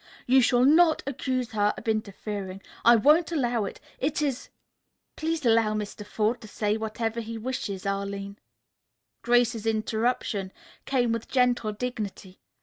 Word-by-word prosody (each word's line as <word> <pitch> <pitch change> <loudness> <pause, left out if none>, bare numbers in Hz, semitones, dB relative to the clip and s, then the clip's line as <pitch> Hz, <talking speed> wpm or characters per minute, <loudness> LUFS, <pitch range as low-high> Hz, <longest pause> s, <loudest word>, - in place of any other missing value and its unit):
"You 260 +1 +5
shall 245 +1 +4
not 320 +2 +5
accuse 255 -2 -2
her 210 -2 +1
of - - -10
interfering. 200 -3 -3 0.2
I 235 +1 +8
won't 305 +9 +4
allow 240 -8 0
it. - - -7 0.2
It 285 +2 0
is 280 -4 -2 0.3
" - - -54
"Please 320 -2 -2
allow 225 -2 +3
Mr. 210 0 -5
Forde 215 +3 -1
to 220 - -10
say 210 0 -1
whatever 225 +1 -3
he 230 0 -6
wishes, 215 -5 -4
Arline." 200 0 -3 0.8
Grace's 235 -2 +2
interruption 220 -3 -1 0.3
came 245 -3 +1
with 230 0 -3
gentle 245 -4 +2
dignity. 210 -5 -5
225 Hz, 145 wpm, -27 LUFS, 210-250 Hz, 0.8 s, I